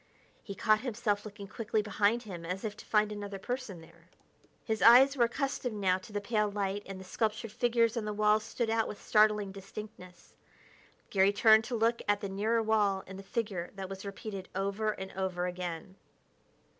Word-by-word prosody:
He 200 - -8
caught 215 +3 +3
himself 215 -4 -1
looking 205 -1 -9
quickly 220 +1 -2
behind 210 +3 +1
him 180 -6 -8
as 180 +3 -4
if 210 -1 -3
to - - -12
find 210 -1 +2
another 205 -1 -5
person 225 -4 -5
there. 165 +1 -19 0.6
His 220 -2 -1
eyes 260 +4 +8
were 240 -3 +4
accustomed 250 -2 -2
now 190 -2 +1
to 190 - -13
the 205 - -2
pale 210 0 0
light, 200 0 -2
and 195 -1 -7
the - - -9
sculptured 220 +3 -2
figures 230 0 +2
on 230 -3 -2
the 210 - -2
walls 210 +1 +3
stood 225 0 -2
out 225 0 +1
with 205 - -7
startling 210 -2 +3
distinctness. 195 -2 -11 0.8
Garry 195 0 +4
turned 220 +1 +5
to 240 - -3
look 230 +1 +1
at 205 0 +2
the 200 - -4
nearer 220 +4 +1
wall 210 -3 +2
and 190 0 -9
the - - -9
figure 195 -5 -3
that 190 -1 -6
was 195 0 -7
repeated 200 -1 -7
over 200 +2 -1
and 190 -2 -5
over 185 -1 -2
again. 180 +1 -5
205 Hz, 190 wpm, -31 LUFS, 195-220 Hz, 0.8 s, eyes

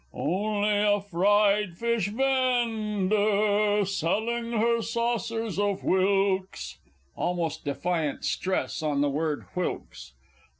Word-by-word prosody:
Only 205 +4 0
a 205 0 +3
fried 200 0 +2
fish 235 -3 0
vend 230 -5 0
ar! 210 0 +2
Selling 220 +6 -1
her 230 +1 +2
saucers 230 -2 -2
of 200 -1 0
whilks, 190 - 0 0.4
[_Almost 165 -3 -2
defiant 155 +1 -2
stress 185 -2 -1
on 150 -2 0
the 145 -1 +2
word 150 +1 -2
"whilks." 180 - -5
205 Hz, 100 wpm, -27 LUFS, 180-220 Hz, 0.4 s, a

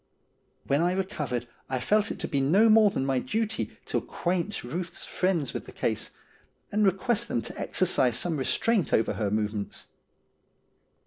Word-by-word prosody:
When 140 +3 +2
I 175 +1 +2
recovered 150 - -2 0.2
I 130 -1 -1
felt 210 - +2
it - - -4
to - - -2
be 140 - 0
no 195 +12 +5
more 215 -1 +7
than 135 - -2
my 135 -1 +1
duty 220 - -2
to - - 0
acquaint 180 +3 -2
Ruth's 170 +9 -4
friends 175 -8 0
with - - -5
the - - -9
case, - - -1 0.6
and 210 +1 +2
request 205 +5 +1
them 115 - -1
to - - -7
exercise 125 -3 +2
some 170 -3 -1
restraint 195 - +1
over 110 - +3
her 105 0 -1
movements. 105 -1 -2
170 Hz, 165 wpm, -27 LUFS, 125-205 Hz, 0.6 s, more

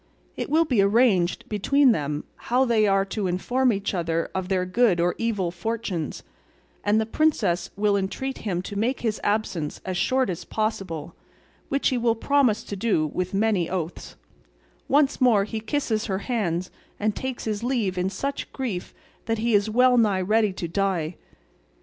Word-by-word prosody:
It - - -4
will 320 +3 +4
be 245 -9 +2
arranged 200 -4 +3
between 260 +6 +3
them 150 -6 -2 0.3
how 255 +2 +4
they 220 -3 +3
are 195 0 +3
to 200 0 -2
inform 245 +8 +1
each 200 -1 -2
other 165 -2 -1
of 190 -1 -3
their 185 -1 +1
good 185 -1 +2
or 175 +1 +2
evil 205 -7 0
fortunes, 185 - -4 0.6
and 210 +1 +3
the 220 - +1
princess 215 - +1
will 205 0 +2
entreat 230 +7 -3
him 180 -4 -2
to 205 - -7
make 235 +6 0
his 220 -3 -1
absence 195 -7 -1
as 185 -1 -3
short 260 -1 +1
as 170 - -6
possible, 195 -7 -3 0.6
which 275 0 +2
he 255 - 0
will 230 -1 +2
promise 255 -2 +2
to 205 - -6
do 195 -6 +1
with 185 +1 -2
many 200 -5 +1
oaths; 175 -2 -4 0.7
once 285 -1 +2
more 230 -6 +5
he 220 +2 -4
kisses 225 -2 -1
her 190 -3 -1
hands, 185 -8 -1 0.3
and 210 0 0
takes 260 -2 -4
his 215 0 -3
leave 235 -7 0
in 180 +1 0
such 275 +9 -4
grief 230 -10 -4 0.3
that 225 0 0
he 230 +1 0
is 205 +1 +3
well 250 +2 +4
nigh 205 -4 +2
ready 215 +2 +2
to 180 -2 -5
die. 180 -3 -1
210 Hz, 175 wpm, -25 LUFS, 185-235 Hz, 0.7 s, more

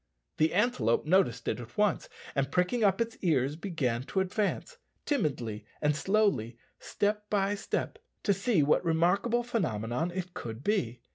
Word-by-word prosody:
The 155 +2 +2
antelope 165 - +2
noticed 155 - +2
it - - -1
at 120 -1 -11
once, 210 -1 +1 0.2
and, 140 -1 0
pricking 180 +6 +1
up 195 0 +3
its 230 +1 -2
ears, 145 -5 +1
began 155 -10 -2
to 190 - -1
advance, 205 - -1 0.3
timidly 130 - -1 0.2
and 150 -1 +2
slowly, 195 - +1 0.2
step 210 0 -1
by 200 -1 +1
step, 205 - -3 0.2
to 200 - +3
see 195 - +2
what 150 - +3
remarkable 180 +9 +2
phenomenon 155 - -1
it 180 0 -5
could 115 +2 -7
be. 125 - 0
180 Hz, 150 wpm, -30 LUFS, 130-210 Hz, 0.3 s, up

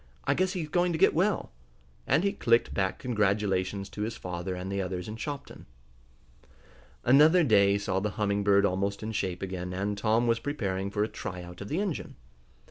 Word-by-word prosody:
I - - +2
guess 185 +1 0
he's 170 -5 -3
going 175 +2 +1
to - - -1
get - - +5
well!" 190 +4 0 0.6
and 145 +7 +3
he 200 0 +1
clicked 115 - +2
back 95 -1 0
congratulations 100 -4 0
to 105 - -7
his 110 +2 -3
father 90 +1 -4
and 90 +2 -5
the 100 0 -1
others 90 -1 -4
in 110 - -5
Shopton. 140 +4 -7 1.4
Another 155 +8 +6
day 100 -6 +4
saw 100 -2 -1
the 105 +2 -1
Humming 100 -1 0
Bird 100 0 +4
almost 100 +2 -1
in 110 - -3
shape 95 -4 -2
again, 90 -1 -4
and 100 +2 -2
Tom 110 +3 +2
was 115 -1 +2
preparing 100 -9 -2
for 105 +1 0
a - - 0
tryout 90 -5 -7
of 100 - -6
the 155 - -1
engine. 195 -6 -3
Mr. - - -31
100 Hz, 195 wpm, -28 LUFS, 95-125 Hz, 1.4 s, Another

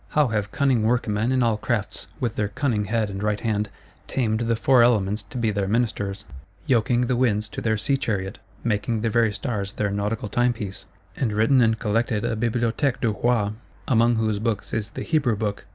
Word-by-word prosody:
How 150 -4 +4
have 105 -2 -1
cunning 135 -5 +2
workmen 110 0 +1
in 130 -1 +2
all 115 -2 +2
crafts, 110 -1 -3
with 120 -4 -2
their 105 - 0
cunning 115 -2 -1
head 110 0 0
and 95 0 -5
right 105 0 0
hand, 105 -2 -1 0.4
tamed 110 -4 0
the 115 0 +1
Four 125 +2 +4
Elements 105 -3 +3
to 125 - -7
be 115 -3 +1
their 100 -1 -1
ministers; 100 -2 -1 0.4
yoking 120 -3 +2
the 125 0 +1
winds 110 -4 +1
to - - -6
their 110 -1 +1
Sea 135 +6 +1
chariot, 100 -6 -3 0.2
making 110 0 0
the 115 -1 0
very 115 -1 +3
Stars 105 -3 -3
their 105 -1 -1
Nautical 105 +2 -2
Timepiece;—and 110 0 -2
written 115 +5 +4
and 115 -1 +3
collected 110 0 0
a - - 0
Bibliothèque 120 +3 0
du 115 -3 +1
Roi; 110 -1 +1 0.4
among 120 -1 +4
whose 110 -2 0
Books 110 -2 -2
is 110 -1 -2
the - - -6
Hebrew 140 -8 +1
Book! 105 -1 -3
110 Hz, 190 wpm, -24 LUFS, 105-120 Hz, 0.4 s, How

